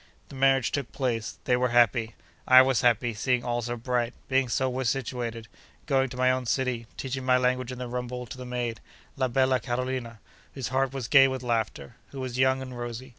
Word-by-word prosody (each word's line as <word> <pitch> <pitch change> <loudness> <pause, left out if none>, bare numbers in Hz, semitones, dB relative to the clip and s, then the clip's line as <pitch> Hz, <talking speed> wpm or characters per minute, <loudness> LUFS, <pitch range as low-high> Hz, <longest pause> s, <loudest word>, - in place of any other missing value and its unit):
The - - -10
marriage 135 -1 +3
took 140 -4 -3
place. 120 -5 -2
They 125 - +2
were 125 0 +1
happy. 115 -1 +3 0.3
I 130 0 +9
was 130 -3 +1
happy, 120 0 +2
seeing 125 +3 0
all 120 0 -1
so 120 +1 -4
bright, 120 0 -1
being 130 -1 +1
so 130 +3 +1
well 130 +1 -2
situated, 115 -2 -3 0.4
going 135 -2 +1
to 125 - -9
my 130 0 +3
own 130 -1 -2
city, 125 -2 -1
teaching 130 0 -4
my 130 0 +4
language 125 0 0
in 125 - -6
the 125 0 -5
rumble 125 0 -4
to 130 - -9
the - - -6
maid, 120 -3 -3 0.4
la 130 -2 0
bella 130 +1 +2
Carolina, 120 -1 -3 0.4
whose 135 -3 -4
heart 130 0 +1
was 135 -4 -4
gay 135 0 +7
with 130 -1 -4
laughter: 110 - -2
who 135 - -9
was 130 -1 -4
young 130 0 +3
and 130 -1 -8
rosy. 120 +2 -6
125 Hz, 210 wpm, -27 LUFS, 120-130 Hz, 0.4 s, I